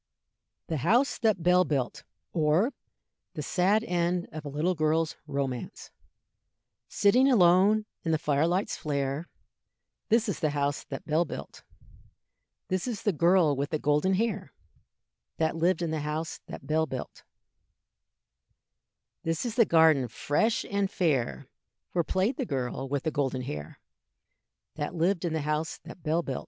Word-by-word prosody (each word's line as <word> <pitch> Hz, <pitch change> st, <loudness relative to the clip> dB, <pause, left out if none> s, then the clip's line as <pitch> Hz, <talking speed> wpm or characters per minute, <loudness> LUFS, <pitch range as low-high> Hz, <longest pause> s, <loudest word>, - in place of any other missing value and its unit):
THE 160 Hz, -, -2 dB
HOUSE 230 Hz, -, +2 dB
THAT 215 Hz, -7 st, +1 dB
BELL 180 Hz, +1 st, +5 dB
BUILT; 140 Hz, -7 st, -2 dB, 0.3 s
Or, 165 Hz, -, +2 dB, 0.6 s
the -, -, -4 dB
Sad 200 Hz, +4 st, +2 dB
End 175 Hz, -3 st, 0 dB
of 155 Hz, 0 st, -7 dB
a 145 Hz, -, -5 dB
little 155 Hz, +6 st, 0 dB
Girl's 160 Hz, 0 st, +1 dB
Romance. 135 Hz, -3 st, -4 dB, 1.0 s
Sitting 250 Hz, +7 st, +4 dB
alone 200 Hz, +1 st, +5 dB, 0.2 s
in 165 Hz, -, 0 dB
the 160 Hz, -, +3 dB
fire 150 Hz, 0 st, +1 dB
light's 185 Hz, +4 st, 0 dB
flare, 140 Hz, +1 st, -2 dB, 0.8 s
This 230 Hz, +1 st, +3 dB
is 200 Hz, -, -2 dB
the 155 Hz, -, +1 dB
house 140 Hz, 0 st, 0 dB
that 135 Hz, -, -7 dB
Bell 155 Hz, +3 st, +2 dB
built. 70 Hz, -, -8 dB, 1.1 s
This 185 Hz, +4 st, -1 dB
is 230 Hz, -5 st, -4 dB
the 205 Hz, -, +3 dB
girl 170 Hz, -2 st, +4 dB
with 140 Hz, +1 st, -2 dB
the 155 Hz, -, 0 dB
golden 150 Hz, +6 st, +2 dB
hair, 210 Hz, -2 st, -1 dB, 0.9 s
That 160 Hz, 0 st, +1 dB
lived 170 Hz, +1 st, +1 dB
in 165 Hz, -, -1 dB
the 160 Hz, -, -1 dB
house 150 Hz, +2 st, -3 dB
that -, -, -9 dB
Bell 160 Hz, +2 st, +1 dB
built. 130 Hz, -2 st, -6 dB, 2.0 s
This 165 Hz, +6 st, -2 dB
is 235 Hz, -, -2 dB
the 230 Hz, -1 st, +5 dB
garden 160 Hz, -7 st, +5 dB
fresh 150 Hz, -, 0 dB
and 200 Hz, -1 st, -1 dB
fair, 130 Hz, -, 0 dB, 0.5 s
Where 170 Hz, -, +1 dB
played 195 Hz, -, 0 dB
the 265 Hz, -, -1 dB
girl 135 Hz, -1 st, -3 dB
with 140 Hz, 0 st, -1 dB
the 160 Hz, -, -1 dB
golden 135 Hz, -3 st, -1 dB
hair, 75 Hz, -10 st, -7 dB, 1.0 s
That 150 Hz, +4 st, -3 dB
lived 175 Hz, +2 st, +1 dB
in 165 Hz, -, -1 dB
the 160 Hz, -, -1 dB
house 150 Hz, +2 st, -2 dB
that 175 Hz, -, -11 dB
Bell 160 Hz, +2 st, 0 dB
built. 135 Hz, -, -3 dB
160 Hz, 150 wpm, -28 LUFS, 145-185 Hz, 2.0 s, BELL